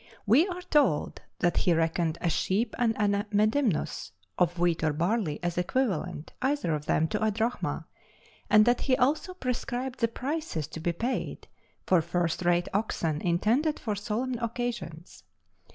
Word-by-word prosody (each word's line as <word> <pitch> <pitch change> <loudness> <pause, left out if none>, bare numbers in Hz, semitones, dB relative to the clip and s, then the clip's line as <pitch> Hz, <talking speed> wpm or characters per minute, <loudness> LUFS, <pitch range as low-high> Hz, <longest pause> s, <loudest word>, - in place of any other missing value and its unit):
We 255 - +5
are 360 -1 -5
told 290 - +1 0.2
that 175 - +2
he 175 - +3
reckoned 165 0 0
a 175 - +1
sheep 215 +8 0
and 230 -2 +2
a 205 0 +1
medimnus 215 - +1 0.2
(of 175 0 +1
wheat 170 -2 +1
or 155 -1 +2
barley?) 170 0 0
as 175 0 -1
equivalent, 180 - -1
either 270 - +1
of 150 0 -4
them, 160 - +2
to - - -1
a 220 - +3
drachma, 225 +3 -2 0.6
and 215 0 +7
that 240 0 +3
he 255 -2 +2
also 295 +8 +1
prescribed 255 -3 -3
the 230 - +3
prices 265 - -3
to - - -7
be 170 +2 0
paid 235 +10 -3 0.4
for 185 -3 +4
first 170 +1 -1
rate 175 0 +2
oxen 165 -7 -1
intended 230 - +1
for 215 -4 -2
solemn 230 +5 -2
occasions. 230 - -4
210 Hz, 155 wpm, -28 LUFS, 170-245 Hz, 0.6 s, and